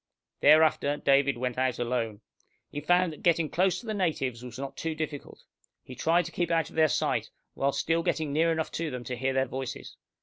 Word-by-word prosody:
Thereafter 150 -1 +4
David 140 -1 +3
went 125 0 -2
out 130 -1 +1
alone. 115 -3 -2 0.5
He 145 - -5
found 175 +2 +2
that 150 - -13
getting 165 -2 +2
close 185 0 +2
to - - -13
the 220 - -3
natives 150 - -1
was 125 -2 -9
not 135 0 -6
too 160 -1 -3
difficult. 155 -2 -6 0.4
He 130 - -10
tried 170 +6 +2
to 170 - -7
keep 175 0 -1
out 165 -1 0
of - - -15
their 160 -1 +5
sight, - - 0 0.2
while 140 +1 0
still 165 +4 0
getting 160 -4 -1
near 165 +2 +3
enough 160 -1 -2
to 165 -1 -3
them 125 -3 -6
to 125 +1 -4
hear 130 +2 -1
their 130 0 +2
voices. 130 0 -6
145 Hz, 210 wpm, -28 LUFS, 130-165 Hz, 0.5 s, their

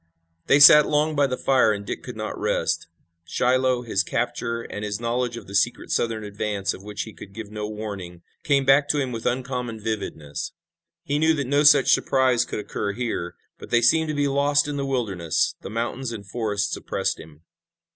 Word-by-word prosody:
They 140 - +5
sat 150 +1 +9
long 150 +1 +1
by 140 -1 +3
the 130 -1 -3
fire 130 -5 +3
and 100 -1 -4
Dick - - -5
could - - -8
not - - -4
rest. - - -1 0.4
Shiloh, 125 +6 +1
his 105 -5 0
capture, 115 +2 -2
and 105 - -7
his 105 0 -3
knowledge 120 0 -2
of - - -9
the 100 - -11
secret 100 -2 0
Southern 115 -2 0
advance, 100 -1 -2
of - - -10
which 105 +1 -5
he 110 - -10
could 100 - -12
give 110 -1 -8
no 105 0 -4
warning, 100 -5 -7 0.2
came 140 -2 +2
back 135 +2 +4
to 150 - +2
him 130 -2 -2
with 115 -2 -4
uncommon 125 -2 -3
vividness. 100 -9 -5 0.5
He 145 +1 -1
knew 160 +1 +3
that 140 -3 -2
no 140 +3 +2
such 150 0 +6
surprise 130 -3 +2
could - - -5
occur 100 -1 -3
here, 110 -7 -3 0.2
but - - -11
they 120 0 +3
seemed 160 +6 +4
to 150 - -2
be 145 0 +1
lost 145 +1 +2
in 145 - -3
the 140 -1 -2
wilderness. 95 -11 0
The - - -7
mountains 120 +3 -3
and 105 -4 -8
forests 105 -1 -2
oppressed - - -2
him. 80 0 -14
115 Hz, 200 wpm, -24 LUFS, 105-135 Hz, 0.5 s, sat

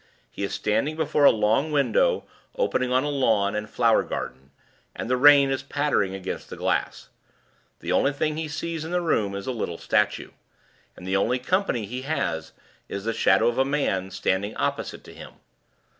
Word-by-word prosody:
He - - -8
is 100 - -2
standing 140 +9 0
before 155 -2 +2
a - - +9
long 110 +8 +1
window 485 - +2 0.3
opening 130 - 0
on 130 +1 +3
a 145 - -1
lawn 110 -8 +1
and 105 0 -4
flower 115 -2 +3
garden, 65 +2 -6 0.5
and - - -5
the 125 - +2
rain 140 +1 +6
is 135 - -1
pattering 145 -10 0
against 95 -1 -6
the - - -7
glass. - - -2 0.7
The 85 - -3
only 135 +9 +3
thing 150 +2 -1
he 160 0 -3
sees 160 +1 -4
in 160 - -6
the 180 +1 0
room 105 - 0
is 100 0 -5
a - - -2
little 95 -8 -4
statue; - - 0 0.7
and 90 - -11
the 95 +1 -1
only 125 +6 +1
company 130 - 0
he 125 +5 -5
has 80 - -2 0.4
is 100 - -5
the 115 +1 -1
Shadow 115 - +3
of 120 +2 0
a - - +5
Man 135 -10 -1
standing 95 +2 -1
opposite - - -3
to - - -13
him. - - -11
125 Hz, 190 wpm, -25 LUFS, 100-145 Hz, 0.7 s, a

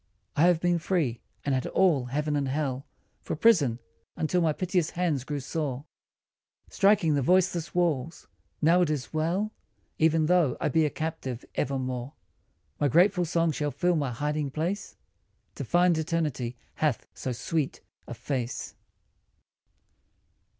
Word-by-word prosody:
I 155 - +4
have 175 -2 +4
been 175 0 +1
free, 155 -8 -1 0.2
and 140 - +1
had 130 -1 0
all 160 -9 +3
heaven 150 +4 -1
and 140 -2 0
hell 135 0 -2 0.3
For - - -4
prison, 155 - +4 0.4
until 175 +3 0
my 160 -2 +3
piteous 180 0 0
hands 165 -7 -1
grew 145 +1 -3
sore 140 -1 -3 0.9
Striking 195 -6 +4
the 140 - +2
voiceless 180 +2 +2
walls: 165 -3 0 0.4
now 170 +3 +5
it 175 - +2
is 150 -2 -3
well 175 +7 0 0.5
Even 160 0 +3
though 170 -6 +3
I - - 0
be 160 -1 +3
a - - -2
captive 145 -6 -4
evermore. 130 0 -2 0.7
My 145 - +3
grateful 180 - +4
song 165 0 +1
shall 150 0 -1
fill 175 +6 +1
my 145 -4 0
hiding 150 +4 -2
place 165 +8 -3 0.6
To - - -5
find 175 0 +3
Eternity 150 -7 -2 0.2
hath 150 -6 0
so 130 - -4
sweet 145 +4 -2 0.3
a - - -6
face. 125 -4 -4
155 Hz, 145 wpm, -27 LUFS, 140-175 Hz, 0.9 s, now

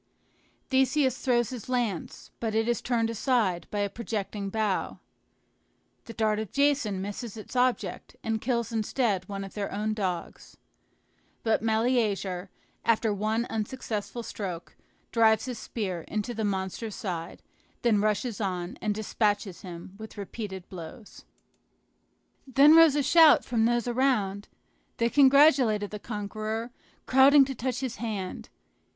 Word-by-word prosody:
Theseus 265 0 +3
throws 240 -3 +1
his 250 -2 -7
lance, 235 -9 -2
but 220 -2 -2
it 225 +1 +1
is 240 -2 0
turned 230 -2 0
aside 220 -6 0
by 205 - -2
a 200 - +1
projecting 205 -2 -4
bough. 215 -2 -1 1.1
The 230 - -8
dart 215 -1 +1
of 220 -3 -5
Jason 275 -9 +1
misses 205 +2 -6
its 215 +4 -10
object, 250 0 0
and 220 -1 -1
kills 235 -2 -1
instead 215 -3 -1
one 195 -1 -4
of 195 - -9
their 205 -2 -4
own 215 +2 -1
dogs. 185 -5 -4 0.9
But 225 -1 +2
Meleager, 220 -5 0 0.3
after 225 -1 +2
one 215 +3 0
unsuccessful 225 0 -4
stroke, 180 -7 -6 0.4
drives 220 -1 +4
his 250 -4 -5
spear 190 -8 -4
into 215 +3 -3
the 220 -1 -3
monster's 200 +2 -3
side, 170 -4 -5 0.4
then 220 -4 +3
rushes 215 +2 -1
on 180 -2 -3
and 210 -1 -1
despatches 205 -3 -1
him 175 0 -9
with 220 0 -10
repeated 200 -2 -6
blows. 185 +5 -10 1.2
Then 275 +4 +6
rose 325 -3 +7
a 290 - +2
shout 320 +1 +6
from 230 -2 +1
those 240 0 +1
around; 235 -6 0 0.5
they 235 0 +1
congratulated 265 -7 +5
the 210 - -6
conqueror, 215 +2 -4 0.3
crowding 270 +2 +6
to 270 - -4
touch 250 0 -3
his 255 -3 -4
hand. 210 -5 -5
220 Hz, 135 wpm, -28 LUFS, 200-245 Hz, 1.2 s, rose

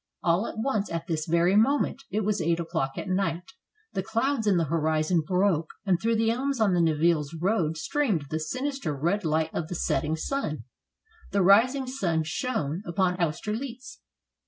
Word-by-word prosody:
All 175 +6 +2
at - - -7
once, 220 -3 -1
at 165 0 -3
this 155 -2 -2
very 170 +3 +3
moment 275 +4 +2
— - - -49
it 215 - -1
was 210 -1 0
eight 165 +1 +1
o'clock 160 -5 -2
at - - -4
night 185 +3 -1 0.2
— 430 +1 -40
the 190 - -1
clouds 230 +3 0
in 195 -3 +4
the 170 - +2
horizon 160 +2 +1
broke, 180 -1 +1 0.2
and 180 -3 +2
through 230 0 +2
the 225 0 +2
elms 270 +2 -1
on 210 -4 +3
the 175 - +3
Nivelles 160 -1 +2
road 170 -4 +1
streamed 200 - 0
the 155 - -1
sinister 255 - -3
red 175 +8 0
light 160 0 0
of 155 - -2
the 180 - -5
setting 160 -1 0
sun. 155 - -3 0.7
The 200 -1 +2
rising 245 +8 +5
sun 185 -12 -1
shone 160 - -2
upon 180 0 0
Austerlitz. 225 - -3
180 Hz, 180 wpm, -27 LUFS, 160-225 Hz, 0.7 s, rising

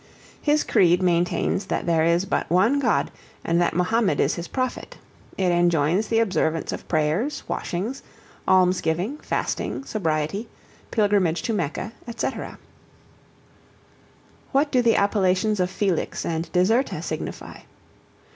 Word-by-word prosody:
His 300 0 +2
creed 180 0 +3
maintains 180 +2 +1
that - - -2
there 165 -2 +2
is 170 +3 +2
but - - -1
one 220 +11 +3
God, 280 - +1 0.3
and 170 +1 +2
that 175 - +1
Mahomed 200 +4 +1
is - - +2
his 170 0 -5
Prophet; 255 -1 -4 0.4
it 185 -2 +2
enjoins 175 +3 +2
the 225 - +1
observance 180 -7 0
of - - -7
prayers, 160 - 0
washings, 210 +10 -3 0.5
almsgiving, 185 - +2
fasting, - - -3
sobriety, 180 - -2 0.4
pilgrimage 200 -6 +1
to 230 - -1
Mecca, 185 +2 -3 0.3
&c. - - 0 2.2
What 285 +2 +2
do 255 - +3
the 230 -2 +3
appellations 200 0 +2
of 180 0 +1
Felix 190 -3 -1
and 165 0 -3
Deserta 220 +9 +1
signify? - - -6
185 Hz, 125 wpm, -24 LUFS, 170-225 Hz, 2.2 s, creed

